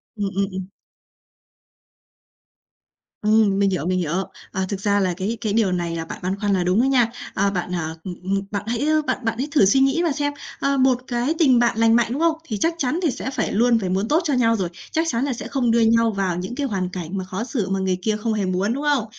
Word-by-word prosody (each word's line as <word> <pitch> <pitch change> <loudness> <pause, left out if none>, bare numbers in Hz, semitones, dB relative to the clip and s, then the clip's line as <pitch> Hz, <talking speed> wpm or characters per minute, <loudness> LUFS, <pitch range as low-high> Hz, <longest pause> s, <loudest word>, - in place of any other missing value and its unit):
Ừm, 205 -2 -2
ừm, 200 0 +2
ừm. 185 0 -5 2.6
Ừm, 210 -2 +3
mình 200 -1 +3
hiểu, 175 -4 -2
mình 185 0 +1
hiểu. 165 -2 -2 0.4
Ờ, 190 0 -1
thực 200 -2 -3
ra 205 0 +2
là 185 -2 +1
cái 215 +4 -2
cái 210 -3 -1
điều 215 -5 +2
này 170 -2 -2
là 165 0 -4
bạn - - -8
băn 190 +2 -2
khoăn 205 -1 +1
là 185 - +1
đúng 185 +6 +2
đó - - +2
nha. 245 -4 +3 0.2
À, 200 +1 +2
bạn, 180 -1 -3
à, 160 -1 -3
ừm, 180 -2 -6
ừm, 195 +1 0
bạn 205 -1 -2
hãy 240 +5 -1 0.2
bạn - - +1
bạn 225 0 0
hãy 270 +4 -2
thử 285 -9 +5
suy 265 +8 +4
nghĩ 270 +5 +3
mà 330 - +1
xem, 290 0 -1 0.3
ờ, 275 0 +1
một 260 -1 +3
cái 245 +5 0
tình 260 -7 +5
bạn 235 -1 +2
lành 225 0 +4
mạnh, 235 -1 +3
đúng 285 +5 -2
không? 330 -1 +3
Thì 215 -9 -4
chắc 330 +9 +1
chắn 300 +2 0
thì 310 - +2
sẽ 260 - -5
phải - - -1
luôn 230 +2 +3
phải 190 - -3
muốn 195 +4 0
tốt 315 +6 +3
cho 295 -4 0
nhau 230 -2 +3
rồi, 185 -5 -2 0.2
chắc 325 +1 +1
chắn 235 +2 0
là 275 - -1
sẽ - - -6
không 245 -4 +1
đưa 235 - +3
nhau 230 0 +4
vào 195 -3 -1
những 185 +7 -5
cái 285 -2 -1
hoàn 190 -5 -2
cảnh 180 +1 -5
mà 190 - -2
khó 185 +4 -4
xử 230 -6 -2
mà 195 0 0
người 185 -1 0
kia 215 +2 0
không 220 +1 -1
hề 205 -3 0
muốn, 185 +5 0
đúng 280 +3 -4
không? 285 -6 +2
215 Hz, 265 wpm, -22 LUFS, 190-250 Hz, 2.6 s, thử